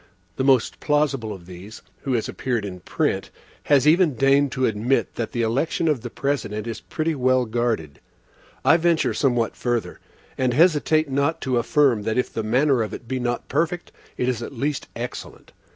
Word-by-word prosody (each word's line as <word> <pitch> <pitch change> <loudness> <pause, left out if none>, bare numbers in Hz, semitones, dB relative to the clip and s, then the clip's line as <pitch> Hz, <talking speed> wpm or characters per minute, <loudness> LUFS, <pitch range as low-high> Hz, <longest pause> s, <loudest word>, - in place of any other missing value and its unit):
The 130 - 0
most 130 -3 +2
plausible 145 -7 0
of 95 -4 -9
these, 90 +5 -11 0.2
who 135 -3 -2
has 115 -3 0
appeared 120 -5 -2
in 90 -2 -7
print, - - -1 0.4
has 145 0 +4
even 160 -2 +4
deigned 135 +2 +3
to 130 - +1
admit 115 +5 0
that 115 - -4
the 120 - -1
election 135 +8 0
of 150 -6 +1
the 120 - -6
President 115 -6 -2
is 115 -1 -5
pretty 160 +1 -2
well 130 -2 +2
guarded.(1) 110 -10 -2 0.7
I 165 - +6
venture 170 -1 +2
somewhat 120 -5 +1
further, 120 -2 -2 0.4
and 125 -2 +1
hesitate 155 -1 +3
not 140 +4 0
to 130 -2 0
affirm, 130 -3 +3
that 110 +3 -2
if 125 - -1
the 115 - -2
manner 125 +4 +2
of 110 - -3
it 120 - -11
be 130 +2 -2
not 120 0 -2
perfect, 170 +4 -1 0.3
it 125 - 0
is 125 -3 -1
at 120 - -6
least 145 +3 -2
excellent. 120 +1 -7
130 Hz, 185 wpm, -23 LUFS, 115-145 Hz, 0.7 s, I